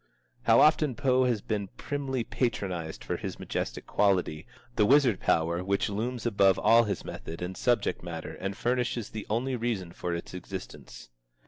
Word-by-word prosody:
How 115 0 +6
often 150 -3 +4
Poe 130 +1 +3
has 120 -5 +1
been 105 -3 -2
primly 135 -4 -2
patronized 95 -11 -2
for - - -2
his - - -5
majestic - - -4
quality, 95 -6 +1 0.3
the 105 -2 +3
wizard 130 -6 +5
power 85 +2 +1
which 100 +2 0
looms 120 +4 -3
above 100 -4 +4
all 115 +1 +5
his 105 - -3
method 80 - -7
and 90 +1 -4
subject 120 -1 +1
matter 85 -2 -6
and 95 +1 -5
furnishes 120 -2 -1
the 110 -1 -6
only 125 +4 0
reason 110 -7 -2
for 85 0 -3
its 85 - -7
existence! 90 -8 -8
105 Hz, 160 wpm, -29 LUFS, 90-125 Hz, 0.3 s, How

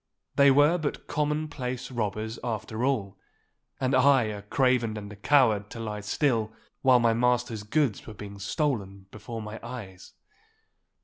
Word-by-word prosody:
They 140 0 +6
were 145 +6 +5
but 150 -3 -3
common 150 +1 -1
place 130 -3 -5
robbers 110 -1 -3
after 110 -1 -3
all, 105 -8 -1 0.6
and 130 +1 0
I 130 0 +5
a 105 -2 -4
craven 120 0 +1
and 105 0 -7
a - - -10
coward 110 -3 +3
to 115 - -8
lie 105 -2 -4
still 110 0 0 0.3
while 130 -2 +6
my 115 -1 +3
master's 120 -2 +1
goods 120 +2 0
were 110 - -8
being 100 -1 -9
stolen 100 - -2
before 110 +1 -7
my 105 +1 -7
eyes. 115 -7 -9
115 Hz, 150 wpm, -27 LUFS, 105-130 Hz, 0.6 s, They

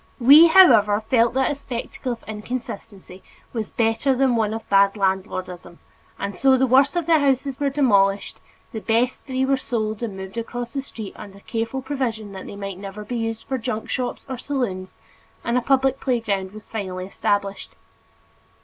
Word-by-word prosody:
We, 285 +7 +9
however, 230 - +6
felt 235 -1 +3
that 265 +1 +2
a - - 0
spectacle 255 -2 -5
of 230 - -12
inconsistency 210 -4 -7 0.3
was 220 -3 -3
better 225 +4 +1
than 260 -1 +2
one 220 -2 +1
of 225 0 -6
bad 200 0 +4
landlordism 185 -3 -3 0.4
and 200 0 -4
so 265 +6 +4
the 265 - +3
worst 270 +4 +4
of 345 -2 0
the 325 -1 +4
houses 275 -1 0
were 285 -1 +1
demolished, 200 -8 +2 0.3
the 225 - -5
best 235 +3 0
three 260 -1 -1
were 270 0 +2
sold 220 -4 -3
and 215 -5 -4
moved 190 +4 -6
across 240 +1 -5
the 275 - -2
street 220 -6 -7
under 200 -1 -11
careful 230 +5 -3
provision 240 -7 -3
that 190 -1 -8
they - - -8
might 195 -2 -6
never 200 +1 -8
be 245 - -4
used 225 -1 -3
for 265 -1 -2
junk 225 -2 -4
shops 250 -1 -3
or 260 -3 -5
saloons, 215 -11 -3 0.5
and 235 - -1
a 250 - +3
public 270 +1 +2
playground 210 -8 -1
was 215 +1 -12
finally 185 -4 -4
established. 200 +1 -2
230 Hz, 175 wpm, -22 LUFS, 200-265 Hz, 0.5 s, We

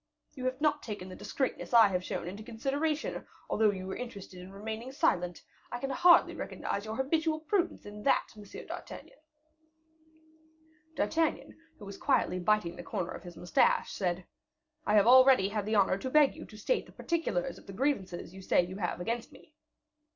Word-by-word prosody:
You 255 -3 -6
have 255 +1 -1
not 295 -1 +2
taken 205 -4 -6
the 185 - -8
discreetness 260 -2 -2
I 225 -3 +8
have 180 -1 -1
shown 170 - -4
into 195 +4 -6
consideration, 280 +7 -2 0.2
although 215 0 +3
you 190 -2 -3
were 190 - -4
interested 200 -7 -8
in 185 +1 -11
remaining 220 +5 -6
silent. 180 - 0 0.3
I - - -2
can 270 +2 -3
hardly 350 +3 +6
recognize 200 +1 -4
your 220 0 -4
habitual 310 +4 0
prudence 350 +2 -1
in 205 0 -9
that, 275 - +2
M. 210 - -11 0.2
d'Artagnan." - - -9 1.8
D'Artagnan, 325 0 0 0.2
who 205 - -11
was 200 0 -9
quietly 180 - +1
biting 185 -2 +1
the - - -6
corner 180 -1 -3
of - - -7
his 175 -2 -11
moustache, 175 - +2
said, 180 -2 -2 0.6
"I 210 - +3
have 205 -1 +6
already 255 -4 +7
had 210 -1 -3
the 215 - +1
honor 195 -1 +3
to 260 - -3
beg 295 0 +5
you - - -9
to 215 - -13
state 475 - -1
the - - -15
particulars 275 -6 -2
of - - -20
the 195 - -8
grievances 190 - -2
you 190 - -10
say 180 -1 +3
you 185 +2 -8
have 175 -3 -2
against 230 +6 -3
me." 310 - -18
215 Hz, 185 wpm, -31 LUFS, 190-270 Hz, 1.8 s, I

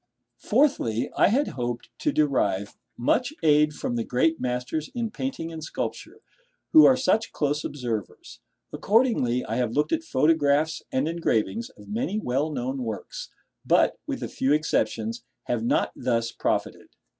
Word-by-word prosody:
Fourthly, 205 - +1
I - - +5
had 265 +9 +2
hoped 120 -1 -4
to 300 - +1
derive 105 - +1 0.2
much 250 - +1
aid 150 -1 +4
from 120 - -3
the 115 - 0
great 160 +8 +1
masters 125 +5 -2
in 230 -2 -2
painting 260 -12 -4
and 160 -1 -7
sculpture, 155 - -5 0.5
who 315 -1 +9
are 260 - +6
such 225 -4 +1
close 150 0 -1
observers. 120 -8 -5 0.3
Accordingly, 205 - +2
I 110 - -3
have 120 -3 0
looked 150 +3 +1
at 325 -1 +1
photographs 155 - +2
and 130 +3 0
engravings 170 - -1
of - - -14
many 215 -1 -2
well 145 -5 0
known 130 -1 -3
works; 110 -4 -6 0.3
but, - - +3
with - - -3
a - - -2
few 135 +2 0
exceptions, 115 -6 0 0.2
have 120 -2 -2
not 115 - +1
thus 115 -2 -1
profited. - - -2
150 Hz, 150 wpm, -25 LUFS, -, 0.5 s, who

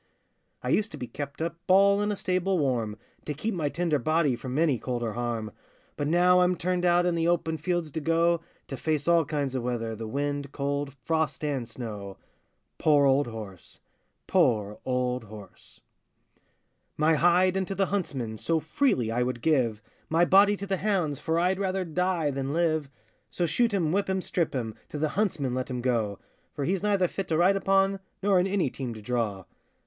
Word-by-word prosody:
I - - -2
used 215 +1 +1
to - - -6
be 125 - -5
kept 140 +4 -6
up 170 0 -3
All 200 +2 +5
in 205 0 0
a - - -1
stable 185 0 0
warm, 120 -8 0 0.3
To 150 - -3
keep 215 +10 -2
my 160 -5 -1
tender 165 -2 0
body 155 0 +2
From 130 +2 -5
any 150 -7 +2
cold 125 -2 -3
or 110 -2 -2
harm; 115 -2 -3 0.4
But 145 - -2
now 180 +3 +5
I'm 180 0 +3
turned 180 +1 -1
out 175 0 +4
In 175 - +2
the 165 0 0
open 165 -2 +1
fields 170 0 -2
to 160 - -4
go, 165 +2 +2 0.3
To 135 - -5
face 155 0 -1
all 170 -2 +4
kinds 145 -3 -2
of 130 - -1
weather, 115 -2 -2
The 110 0 -6
wind, 140 +2 -2
cold, 140 0 -2
frost, 160 +1 0
and 135 -6 -2
snow. 105 -5 -7 0.6
Poor 145 -2 +4
old 135 0 +3
horse! 105 -6 -9 0.5
poor 110 - +1
old 125 -2 -1
horse! 105 -1 -13 1.2
My 155 +2 +3
hide 175 +4 +4
unto 190 0 -2
the 195 - +2
huntsman 135 - -3
So 165 -1 +1
freely 155 - +1
I 120 +2 0
would 125 -1 -2
give, 120 -9 +1 0.3
My 165 +2 +4
body 200 +3 +5
to 200 - -5
the 195 -1 -1
hounds, 180 -8 0
For 160 0 -1
I'd 180 +2 +1
rather 190 -1 -1
die 175 -2 0
than 135 +1 -3
live: 160 -3 +1 0.4
So 175 - -1
shoot 230 +9 +2
him, 175 -6 +1
whip 195 +2 0
him, 190 -1 0
strip 170 -6 -1
him, 115 -4 -2 0.2
To - - -5
the 155 +1 0
huntsman 165 - -1
let 130 +1 -3
him 125 -1 -3
go; 115 -5 0 0.4
For 140 -2 -2
he's 190 +3 0
neither 200 -3 +2
fit 195 +1 -5
to 160 - 0
ride 180 +4 +4
upon, 195 0 +2 0.2
Nor 195 -2 +4
in 180 - +2
any 190 -9 0
team 125 -4 -5
to 110 - -9
draw. 105 -5 -2
155 Hz, 195 wpm, -27 LUFS, 125-180 Hz, 1.2 s, All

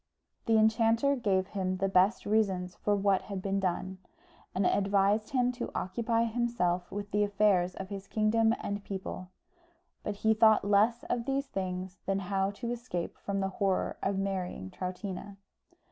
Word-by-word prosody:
The 225 -1 +4
enchanter 225 +5 +3
gave 195 -6 0
him 185 -2 -2
the 195 +1 +1
best 195 +3 +3
reasons 195 -4 +1
for 205 - 0
what 200 -1 +2
had 200 -2 -5
been 195 +1 -1
done, 185 0 -2 0.6
and 190 +1 +1
advised 200 +2 +2
him 250 -2 +2
to 245 0 -5
occupy 230 +4 0
himself 225 -7 0
with 205 0 -5
the 205 - +2
affairs 200 -3 +2
of 190 0 -7
his 200 -1 -7
kingdom 225 +1 +2
and 200 0 -3
people; 190 -2 -6 0.7
but 210 - -3
he 220 - +6
thought 220 -1 +5
less 215 +4 +3
of 235 -1 -2
these 275 +1 0
things 185 -4 -4
than 195 0 +1
how 195 0 0
to 235 +4 -5
escape 235 -8 -4
from 200 -1 -2
the 195 - 0
horror 195 0 0
of 195 0 0
marrying 185 - -3
Troutina. 190 +2 -6
200 Hz, 160 wpm, -30 LUFS, 190-220 Hz, 0.7 s, he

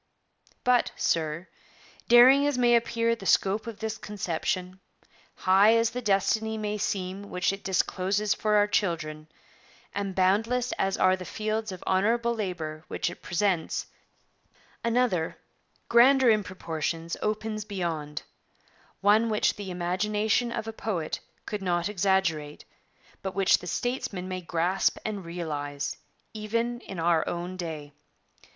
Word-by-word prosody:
'But, 250 -2 +3
sir, 160 +2 -1 0.6
daring 260 +4 +7
as 290 -3 0
may 240 -1 +4
appear 230 0 +1
the 195 -4 -7
scope 200 +4 +2
of 225 -3 -6
this 220 0 -4
conception, 185 -1 -3 0.6
high 195 +4 +5
as 230 0 +2
the 250 - -4
destiny 220 +1 +1
may 210 0 -3
seem 195 0 -3
which 180 +1 0
it 195 - -8
discloses 195 +2 +1
for 215 -1 0
our 205 0 +5
children, 160 -7 -1 0.7
and 200 -2 -3
boundless 225 +7 +2
as 195 0 +1
are 185 0 +4
the 185 - -8
fields 215 +2 -3
of 185 - -8
honourable 230 +5 +2
labour 170 -8 -4
which 175 - -2
it - - -12
presents, 180 -2 0 1.0
another, 230 -8 +1 0.5
grander 255 +1 +6
in 215 -1 +2
proportions, 165 -2 -4
opens 215 0 -2
beyond; 170 -7 -4 0.8
one 215 +3 +4
which 210 -1 +2
the 200 -2 -7
imagination 210 +6 0
of 225 -1 -4
a 225 - -4
poet 180 -8 -3 0.3
could 210 -2 -4
not 175 -1 0
exaggerate, 185 -7 0 0.6
but 190 -1 -5
which 195 -1 +4
the 180 - -9
statesman 210 -6 -2
may 185 0 -4
grasp 175 +2 +1
and 205 -3 -3
realize, 145 -4 -4 0.4
even 230 +3 -2
in 190 -6 -8
our 165 -1 +3
own 175 +1 -4
day. 155 -5 -6
195 Hz, 135 wpm, -27 LUFS, 175-220 Hz, 1.0 s, daring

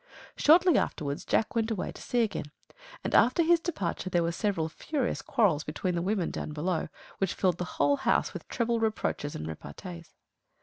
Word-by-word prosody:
Shortly 340 +1 +6
afterwards 145 -1 -3
Jack 220 - +1
went 225 -1 0
away 215 -5 -2
to - - -12
sea 240 -1 +1
again; 210 -8 -2 0.6
and - - -3
after 255 +8 +5
his 340 +1 +5
departure 200 - -3
there 175 -2 +2
were 170 - 0
several 170 -3 -1
furious 260 - -2
quarrels 200 - +2
between 180 +4 -2
the 170 - 0
women 190 -1 0
down 150 - -5
below, 160 +2 -1 0.3
which 195 -2 0
filled 180 -3 +1
the 180 - -1
whole 285 0 +3
house - - +1
with - - -8
treble 235 -1 0
reproaches 215 -9 -1
and 75 - -5
repartees. 170 - -8
195 Hz, 180 wpm, -29 LUFS, 170-235 Hz, 0.6 s, Shortly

